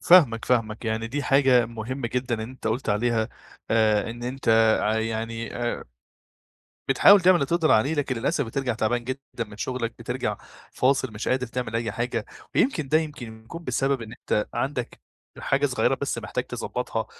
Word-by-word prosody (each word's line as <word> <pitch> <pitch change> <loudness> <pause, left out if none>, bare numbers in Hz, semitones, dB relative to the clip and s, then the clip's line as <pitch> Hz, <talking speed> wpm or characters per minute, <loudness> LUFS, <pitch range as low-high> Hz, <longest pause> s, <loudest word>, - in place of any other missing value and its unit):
فاهمك 140 -11 +6
فاهمك، 115 -2 0
يعني 110 0 -1
دي 145 +5 -3
حاجة 135 -4 +4
مهمة 115 +3 -4
جدًا 125 0 -1
إن 110 - -5
أنت 125 +3 -7
قلت 115 +3 -1
عليها 110 +1 +1 0.4
آآ، 110 -1 +3
إن 120 +1 -8
أنت 125 +1 -4 0.3
ع 110 +1 +1
يعني 115 +1 -3
آآ 120 -1 -2 1.1
بتحاول 195 +9 +7
تعمل 185 +1 +6
اللي 160 - +2
تقدر 165 +2 +2
عليه، 135 +8 +3
لكن 145 -4 -1
للأسف 140 +5 0
بترجع 125 +2 -2
تعبان 120 +2 0
جدًا 130 +2 -4 0.2
من 105 -2 -13
شغلك، 120 0 -3
بترجع - - -3 0.3
فاصل 130 -2 +1
مش 105 - -5
قادر 130 0 +1
تعمل 115 -2 -4
أي 115 -2 -1
حاجة، 115 0 -2 0.3
ويمكن 170 - +2
ده 155 - +4
يمكن 125 -8 -5
يكون 165 +9 -9
بسبب 135 -1 0
إن 110 -1 -8
أنت 105 -3 -1
عندك 130 -3 -3 0.4
حاجة - - +1
صغيرة - - +1
بس - - -1
محتاج - - -3
تضبّطها - - -3
120 Hz, 170 wpm, -25 LUFS, 115-135 Hz, 1.1 s, بتحاول